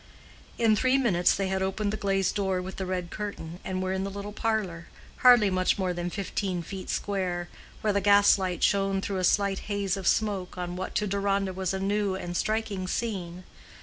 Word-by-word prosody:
In 225 Hz, -2 st, +4 dB
three 255 Hz, +5 st, +3 dB
minutes 190 Hz, -10 st, +3 dB
they 195 Hz, -1 st, -1 dB
had 190 Hz, 0 st, -1 dB
opened 200 Hz, +2 st, -1 dB
the -, -, 0 dB
glazed 195 Hz, -2 st, 0 dB
door 190 Hz, -2 st, 0 dB
with 185 Hz, +1 st, -6 dB
the 190 Hz, -, -3 dB
red 180 Hz, -2 st, -3 dB
curtain, 185 Hz, -5 st, -6 dB
and 185 Hz, 0 st, -2 dB
were 185 Hz, 0 st, -1 dB
in 190 Hz, 0 st, -1 dB
the 195 Hz, -, -3 dB
little 200 Hz, +1 st, -6 dB
parlor, 205 Hz, -7 st, -2 dB, 0.3 s
hardly 240 Hz, -6 st, +6 dB
much 185 Hz, 0 st, +2 dB
more 185 Hz, -2 st, 0 dB
than 175 Hz, 0 st, -3 dB
fifteen 190 Hz, -2 st, -3 dB
feet 190 Hz, +3 st, -7 dB
square, 180 Hz, -3 st, -2 dB, 0.3 s
where 210 Hz, -1 st, +1 dB
the 200 Hz, -, +1 dB
gaslight 200 Hz, -2 st, +4 dB
shone 195 Hz, -1 st, +2 dB
through 195 Hz, 0 st, -3 dB
a -, -, -2 dB
slight 200 Hz, +1 st, +2 dB
haze 200 Hz, -2 st, 0 dB
of 195 Hz, -2 st, -4 dB
smoke 200 Hz, -5 st, 0 dB
on 180 Hz, 0 st, -4 dB
what 185 Hz, +1 st, -5 dB
to 210 Hz, -, +1 dB
Deronda 195 Hz, -1 st, 0 dB
was 185 Hz, -1 st, -2 dB
a 190 Hz, -, -2 dB
new 200 Hz, 0 st, 0 dB
and 175 Hz, -2 st, -5 dB
striking 215 Hz, -2 st, -1 dB
scene. 185 Hz, -5 st, -3 dB
195 Hz, 200 wpm, -27 LUFS, 185-205 Hz, 0.3 s, hardly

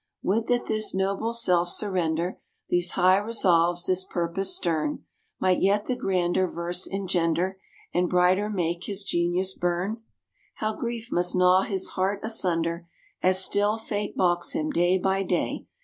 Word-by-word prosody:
Would 220 Hz, +4 st, 0 dB
that 245 Hz, -1 st, +1 dB
this 215 Hz, -3 st, -1 dB
noble 195 Hz, +4 st, -1 dB
self 180 Hz, -7 st, +2 dB
surrender, 175 Hz, -3 st, 0 dB, 0.3 s
These 175 Hz, 0 st, +1 dB
high 185 Hz, +1 st, +4 dB
resolves, 175 Hz, -5 st, +2 dB
this 185 Hz, 0 st, 0 dB
purpose 185 Hz, +2 st, -1 dB
stern, 170 Hz, -, -2 dB, 0.3 s
Might 185 Hz, -1 st, +2 dB
yet 205 Hz, +2 st, +2 dB
the 255 Hz, -, -1 dB
grander 185 Hz, -5 st, 0 dB
verse 175 Hz, +1 st, -3 dB
engender, 185 Hz, -1 st, -1 dB, 0.3 s
And 180 Hz, 0 st, +1 dB
brighter 185 Hz, +3 st, +3 dB
make 175 Hz, -3 st, -2 dB
his 200 Hz, -1 st, -3 dB
genius 180 Hz, +1 st, 0 dB
burn! 180 Hz, +6 st, -2 dB, 0.5 s
"How 215 Hz, 0 st, -2 dB
grief 235 Hz, 0 st, -5 dB
must 175 Hz, +1 st, +1 dB
gnaw 180 Hz, +1 st, +5 dB
his 190 Hz, -1 st, -2 dB
heart 195 Hz, +2 st, -1 dB
asunder 170 Hz, -6 st, -1 dB, 0.3 s
As 185 Hz, +1 st, +4 dB
still 205 Hz, +2 st, +1 dB
Fate 210 Hz, -2 st, -4 dB
balks 175 Hz, -1 st, +1 dB
him, 310 Hz, -1 st, -1 dB
day 180 Hz, -6 st, +2 dB
by 190 Hz, +1 st, 0 dB
day!" 190 Hz, -, -2 dB
185 Hz, 150 wpm, -26 LUFS, 175-205 Hz, 0.5 s, gnaw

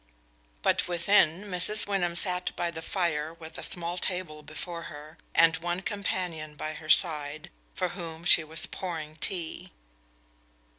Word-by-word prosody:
But -, -, +3 dB
within, 175 Hz, 0 st, +3 dB
Mrs. 200 Hz, +2 st, +3 dB
Wyndham 180 Hz, -4 st, 0 dB
sat 180 Hz, 0 st, -1 dB
by 170 Hz, -1 st, -1 dB
the 160 Hz, -1 st, -6 dB
fire 165 Hz, -3 st, -1 dB
with 160 Hz, -1 st, -9 dB
a -, -, -6 dB
small 175 Hz, 0 st, +1 dB
table 180 Hz, -5 st, -3 dB
before 165 Hz, +3 st, -6 dB
her, 150 Hz, +2 st, -11 dB, 0.2 s
and 165 Hz, -1 st, +6 dB
one 175 Hz, +2 st, -2 dB
companion 180 Hz, -7 st, -3 dB
by 155 Hz, +1 st, -4 dB
her 155 Hz, 0 st, -10 dB
side, 150 Hz, -2 st, +3 dB, 0.2 s
for 180 Hz, -1 st, 0 dB
whom 170 Hz, -3 st, -7 dB
she 165 Hz, -, +7 dB
was 155 Hz, 0 st, -1 dB
pouring 160 Hz, -4 st, -5 dB
tea. 175 Hz, +1 st, -4 dB
170 Hz, 145 wpm, -29 LUFS, 155-180 Hz, 0.2 s, she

